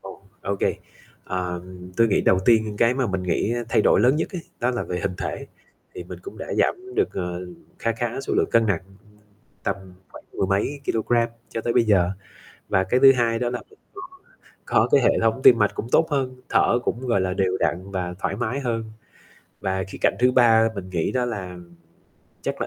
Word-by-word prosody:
Ồ, 95 Hz, 0 st, -11 dB, 0.2 s
ô 100 Hz, 0 st, -2 dB
kê. -, -, 0 dB, 0.5 s
À, 90 Hz, -1 st, -3 dB, 0.4 s
tôi 115 Hz, -1 st, +4 dB
nghĩ -, -, +2 dB
đầu 95 Hz, -, +3 dB
tiên 110 Hz, -3 st, +3 dB
cái 120 Hz, +2 st, +4 dB
mà 130 Hz, -2 st, 0 dB
mình 95 Hz, -2 st, -2 dB
nghĩ 100 Hz, +5 st, 0 dB
thay 110 Hz, -, +3 dB
đổi -, -, +4 dB
lớn 130 Hz, +6 st, +4 dB
nhất -, -, -1 dB
ấy, 180 Hz, -3 st, -5 dB, 0.2 s
đó 125 Hz, -, +2 dB
là 120 Hz, -, -2 dB
về 90 Hz, -, -4 dB
hình 95 Hz, -2 st, -2 dB
thể, -, -, -4 dB, 0.5 s
thì -, -, -7 dB
mình -, -, -9 dB
cũng 395 Hz, -, -10 dB
đã -, -, -5 dB
giảm 380 Hz, 0 st, -1 dB
được, 410 Hz, -2 st, +2 dB
à, -, -, -2 dB, 0.6 s
kha 115 Hz, -, 0 dB
khá 120 Hz, +3 st, -3 dB
số 135 Hz, -, -3 dB
lượng -, -, +1 dB
cân 115 Hz, -1 st, +3 dB
nặng, 95 Hz, -5 st, 0 dB, 0.8 s
tầm 100 Hz, -, 0 dB, 0.3 s
khoảng -, -, -13 dB
mười -, -, -1 dB
mấy 100 Hz, +9 st, -1 dB
kilôgam 115 Hz, +1 st, +1 dB, 0.2 s
cho 115 Hz, -, -3 dB
tới 120 Hz, +1 st, -1 dB
bây 120 Hz, -, +4 dB
giờ. 95 Hz, -5 st, +3 dB, 0.6 s
Và 95 Hz, -, +2 dB
cái 125 Hz, +6 st, +1 dB
thứ 135 Hz, -1 st, +9 dB
2 115 Hz, -3 st, +1 dB
đó 120 Hz, 0 st, -1 dB
là 125 Hz, -, -3 dB
mình 425 Hz, -, -21 dB, 0.2 s
có 380 Hz, -, -8 dB, 0.7 s
có -, -, +3 dB
cái 140 Hz, -, +5 dB
hệ -, -, +3 dB
thống 115 Hz, +3 st, +2 dB
tim 120 Hz, -, +8 dB
mạch 105 Hz, -1 st, +3 dB
cũng 115 Hz, -, -4 dB
tốt 160 Hz, -, +4 dB
hơn, 130 Hz, -2 st, -2 dB
thở 120 Hz, -, +3 dB
cũng, 120 Hz, -, -2 dB
gọi 115 Hz, -5 st, +2 dB
là, 95 Hz, -1 st, -1 dB
đều 95 Hz, -1 st, 0 dB
đặn 95 Hz, +3 st, -1 dB
và 90 Hz, -2 st, -3 dB
thoải 100 Hz, -, -2 dB
mái 120 Hz, +4 st, -2 dB
hơn. 115 Hz, -4 st, -2 dB, 0.8 s
Và 95 Hz, -1 st, -1 dB
khía -, -, -9 dB
cạnh -, -, +3 dB
thứ 125 Hz, +1 st, +4 dB
3 115 Hz, -2 st, +5 dB
mình 95 Hz, -2 st, -7 dB
nghĩ 85 Hz, -3 st, -1 dB
đó 125 Hz, -1 st, +1 dB
là 95 Hz, -7 st, -5 dB, 0.9 s
chắc -, -, -3 dB
là -, -, -1 dB
115 Hz, 215 wpm, -23 LUFS, 95-125 Hz, 0.9 s, thứ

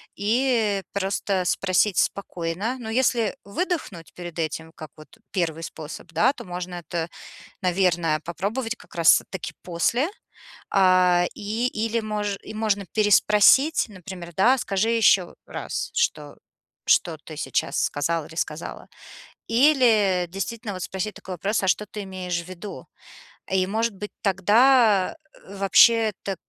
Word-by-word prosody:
и 220 Hz, -2 st, +1 dB
просто 195 Hz, -1 st, -1 dB
спросить 185 Hz, +1 st, +1 dB
спокойно. 195 Hz, +5 st, -1 dB
Но 225 Hz, -2 st, -7 dB
если 235 Hz, -2 st, +1 dB
выдохнуть 200 Hz, -, -4 dB
перед 175 Hz, -2 st, -9 dB
этим, 160 Hz, 0 st, -3 dB
как 155 Hz, -, -9 dB
вот 155 Hz, +8 st, -16 dB
1 165 Hz, -4 st, -2 dB
способ, 160 Hz, +1 st, -8 dB
да, 215 Hz, -, +3 dB
то -, -, -10 dB
можно 180 Hz, 0 st, -6 dB
это, 170 Hz, -1 st, -4 dB, 0.5 s
наверное, 175 Hz, -4 st, +1 dB
попробовать 220 Hz, +7 st, -3 dB
как -, -, -18 dB
раз 170 Hz, -1 st, +5 dB
таки 190 Hz, -, -5 dB
после. 230 Hz, -, 0 dB, 0.6 s
А, 185 Hz, -2 st, +4 dB
и 220 Hz, +4 st, -2 dB
или 225 Hz, 0 st, -1 dB
мож 210 Hz, -2 st, -3 dB
и -, -, -9 dB
можно 215 Hz, -3 st, -1 dB
переспросить, 215 Hz, +8 st, +4 dB
например, 180 Hz, -3 st, -9 dB
да: 250 Hz, +7 st, +4 dB
скажи 205 Hz, -1 st, 0 dB
ещё 200 Hz, -6 st, +3 dB
раз, -, -, -5 dB
что 150 Hz, -2 st, -1 dB, 0.5 s
что -, -, +3 dB
ты -, -, -10 dB
сейчас -, -, -1 dB
сказал 160 Hz, +2 st, -1 dB
или 160 Hz, -, -13 dB
сказала. 160 Hz, -1 st, -5 dB, 0.6 s
Или 230 Hz, -8 st, +4 dB
действительно 205 Hz, +3 st, -5 dB
вот 185 Hz, -, -6 dB
спросить 190 Hz, +2 st, -4 dB
такой 185 Hz, -1 st, -8 dB
вопрос: 200 Hz, +4 st, -1 dB
а -, -, 0 dB
что 210 Hz, -, +1 dB
ты 210 Hz, 0 st, -7 dB
имеешь 180 Hz, -2 st, -4 dB
в 170 Hz, -, -15 dB
виду? 185 Hz, +3 st, -8 dB, 0.6 s
И 190 Hz, -1 st, +2 dB
может 220 Hz, +2 st, -1 dB
быть, 210 Hz, +2 st, -7 dB
тогда 210 Hz, +1 st, +4 dB, 0.3 s
вообще 210 Hz, +3 st, +4 dB
это, 195 Hz, -1 st, -3 dB
195 Hz, 135 wpm, -24 LUFS, 175-220 Hz, 0.6 s, раз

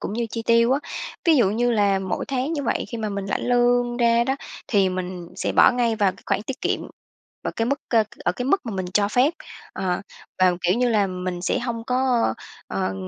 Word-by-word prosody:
cũng -, -, -4 dB
như 235 Hz, +1 st, -1 dB
chi 230 Hz, -, -4 dB
tiêu 230 Hz, +1 st, +4 dB
á. 275 Hz, -, +2 dB, 0.5 s
Ví 330 Hz, -3 st, +5 dB
dụ 230 Hz, -7 st, +4 dB
như 240 Hz, +3 st, +1 dB
là 205 Hz, -4 st, +3 dB
mỗi 190 Hz, -1 st, -3 dB
tháng 270 Hz, +3 st, -1 dB
như 290 Hz, -3 st, -2 dB
vậy 235 Hz, -, -1 dB
khi 235 Hz, -, -5 dB
mà 215 Hz, -1 st, -2 dB
mình 200 Hz, -1 st, -4 dB
lãnh 200 Hz, -, -2 dB
lương 245 Hz, 0 st, +2 dB
ra 235 Hz, -1 st, +3 dB
đó, 265 Hz, +2 st, 0 dB, 0.3 s
thì 200 Hz, -4 st, +3 dB
mình 180 Hz, -1 st, -5 dB
sẽ -, -, -1 dB
bỏ -, -, +7 dB
ngay 240 Hz, -2 st, +1 dB
vào 200 Hz, -3 st, +2 dB
cái -, -, -19 dB
khoản -, -, 0 dB
tiết 260 Hz, +4 st, -6 dB
kiệm -, -, 0 dB, 0.6 s
ở -, -, -2 dB
cái 225 Hz, -, 0 dB
mức 280 Hz, +3 st, 0 dB
ơ, 225 Hz, -3 st, +4 dB, 0.2 s
ở -, -, +2 dB
cái 245 Hz, -, -4 dB
mức 285 Hz, +2 st, +1 dB
mà 230 Hz, -, -4 dB
mình 185 Hz, -1 st, -2 dB
cho 205 Hz, -1 st, +3 dB
phép. 250 Hz, +9 st, +3 dB, 0.4 s
Ờ, 180 Hz, -2 st, -1 dB, 0.4 s
và, 185 Hz, -1 st, +5 dB
kiểu 180 Hz, +1 st, +2 dB
như 250 Hz, 0 st, +2 dB
là, 210 Hz, -3 st, +2 dB
mình 180 Hz, -1 st, -4 dB
sẽ 180 Hz, -, 0 dB
hông 235 Hz, -2 st, -4 dB
có 250 Hz, -, +1 dB, 0.3 s
ờ, 95 Hz, 0 st, -2 dB
230 Hz, 235 wpm, -23 LUFS, 190-245 Hz, 0.6 s, bỏ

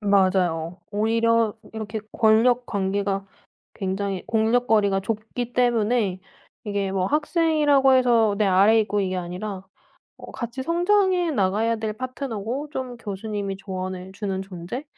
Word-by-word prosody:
맞아요. 185 Hz, -4 st, +1 dB
오히려 230 Hz, +1 st, +2 dB, 0.2 s
이렇게 220 Hz, 0 st, -5 dB
권력 235 Hz, +2 st, +3 dB
관계가 195 Hz, 0 st, -1 dB, 0.5 s
굉장히 195 Hz, 0 st, -3 dB
공력 225 Hz, +2 st, +2 dB
거리가 200 Hz, -3 st, +3 dB
좁기 225 Hz, +3 st, -4 dB
때문에 230 Hz, -5 st, +1 dB, 0.5 s
이게 200 Hz, -2 st, -1 dB
뭐 190 Hz, -1 st, 0 dB
학생이라고 300 Hz, -, +3 dB
해서 235 Hz, -5 st, +4 dB
내 210 Hz, -, +2 dB
아래에 200 Hz, +4 st, +5 dB
있고 205 Hz, -1 st, -1 dB
이게 185 Hz, -1 st, -1 dB
아니라 185 Hz, +2 st, -5 dB, 0.5 s
어 -, -, -11 dB
같이 240 Hz, +2 st, -5 dB
성장해 355 Hz, +1 st, +2 dB
나가야 215 Hz, +1 st, +1 dB
될 220 Hz, -1 st, -3 dB
파트너고 255 Hz, +2 st, -4 dB
좀 255 Hz, -3 st, -5 dB
교수님이 200 Hz, -2 st, -4 dB
조언해 185 Hz, -1 st, -6 dB
주는 195 Hz, -2 st, -3 dB
존재? 190 Hz, -, -6 dB
215 Hz, 295 characters per minute, -24 LUFS, 195-245 Hz, 0.5 s, 아래에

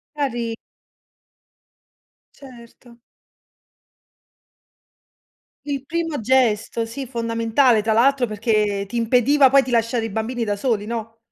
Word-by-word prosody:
Cari 240 Hz, -6 st, -2 dB, 1.8 s
Certo. 240 Hz, -2 st, -16 dB, 2.7 s
Il 280 Hz, -2 st, -4 dB
primo 330 Hz, -1 st, -3 dB
gesto, 230 Hz, -2 st, +1 dB
sì, 270 Hz, +4 st, -6 dB
fondamentale, 230 Hz, 0 st, +1 dB
tra 220 Hz, 0 st, +1 dB
l'altro, 260 Hz, +3 st, +3 dB
perché 210 Hz, -2 st, -1 dB
ti 205 Hz, -, -9 dB
impediva 250 Hz, +4 st, +3 dB
poi 275 Hz, 0 st, +6 dB
di 260 Hz, -, -7 dB
lasciare 230 Hz, -1 st, 0 dB
i -, -, -4 dB
bambini 225 Hz, +3 st, -3 dB
da 205 Hz, -2 st, -1 dB
soli, 210 Hz, -1 st, -2 dB
no? 225 Hz, -1 st, -5 dB
235 Hz, 105 wpm, -21 LUFS, 225-265 Hz, 2.7 s, poi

